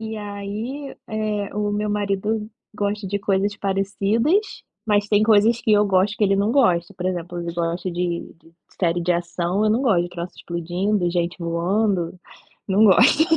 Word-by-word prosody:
E 220 0 -5
aí, 210 +7 -6
eh, 215 -2 -2
o 210 0 -1
meu 210 +1 -1
marido 210 +1 -1 0.3
gosta 205 0 -2
de 200 +2 -2
coisas 200 +1 0
parecidas, 200 - +1 0.5
mas 205 -1 +2
tem 205 0 +3
coisas 220 +2 +4
que 220 - +1
eu 210 0 +4
gosto 195 +1 +2
que 215 - +2
ele 195 0 +3
não 200 +2 +1
gosta. 185 -11 +2
Por 180 - -3
exemplo, 175 -1 -3
ele 170 0 -4
gosta 170 +2 -2
de 175 0 -3
de 165 - -20 0.3
série 175 -1 +1
de 175 +1 +1
ação, 175 +3 -1
eu 215 - +3
não 230 +5 +1
gosto 205 -10 +3
de 175 - -5
troço 175 0 -6
explodindo, 175 +3 -1
gente 175 0 -1
voando, 175 +2 0 0.5
não 200 +3 +4
gosto. 240 - +6
200 Hz, 175 wpm, -22 LUFS, 175-210 Hz, 0.5 s, gosto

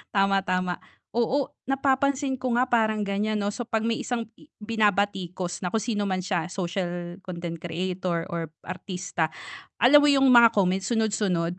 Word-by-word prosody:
tama, 195 0 +3
tama, 185 -1 -1 0.4
oo, 255 +4 +1 0.2
napapansin 270 0 +1
ko 255 -1 -2
nga 255 - +2
parang 220 -3 +2
gan'yan 210 +2 -1
'no, 200 - -1
so 240 - -3
pag 225 -1 -1
may 230 -1 -1
isang 235 -2 -3
i 295 - -20
binabatikos 200 -5 -1
na 180 - -2
kung 225 - +1
sino 220 -3 -1
man 190 -2 -1
siya, 180 -2 -2
social 175 -1 -3
content 170 -2 -5
creator 180 -1 -2
or 165 -2 -4 0.2
artista. 180 -4 -3 0.5
Alam 290 +4 +7
mo - - +4
yung 270 -1 +4
mga 235 -2 +7
comments, 190 0 +1
sunod-sunod 195 -6 0
200 Hz, 160 wpm, -26 LUFS, 180-230 Hz, 0.5 s, Alam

